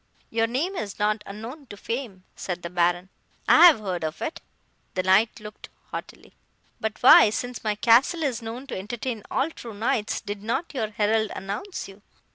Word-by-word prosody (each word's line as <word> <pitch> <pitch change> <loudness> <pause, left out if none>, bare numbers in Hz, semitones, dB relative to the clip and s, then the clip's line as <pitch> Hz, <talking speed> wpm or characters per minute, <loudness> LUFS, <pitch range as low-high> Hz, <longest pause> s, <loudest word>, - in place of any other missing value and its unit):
"'Your 225 0 +1
name 300 +12 -2
is 205 - -5
not 210 +1 +1
unknown 230 +8 -8
to 205 - -10
fame,' 230 -5 -5
said 180 -2 -5
the 170 - -5
Baron, 175 +1 +1 0.4
'I - - +8
have 315 -9 +5
heard 185 -5 -3
of 155 +1 -4
it.' 320 - -4 0.5
(The 185 - 0
Knight 190 +4 +3
looked 210 0 -11 0.2
haughtily.) - - -8 0.5
'But 220 -1 -4
why, 245 - +9
since 245 +3 -4
my 215 -1 0
castle 250 +10 +4
is 255 -5 -1
known 230 +4 -7
to - - -6
entertain 220 +4 -4
all 315 - 0
true 230 -8 -10
knights, 220 0 -1
did 205 -2 -6
not 235 +11 -2
your 225 -6 -2
herald 215 0 +1
announce 205 - -5
you? 195 +1 -14
220 Hz, 180 wpm, -25 LUFS, 200-245 Hz, 0.5 s, why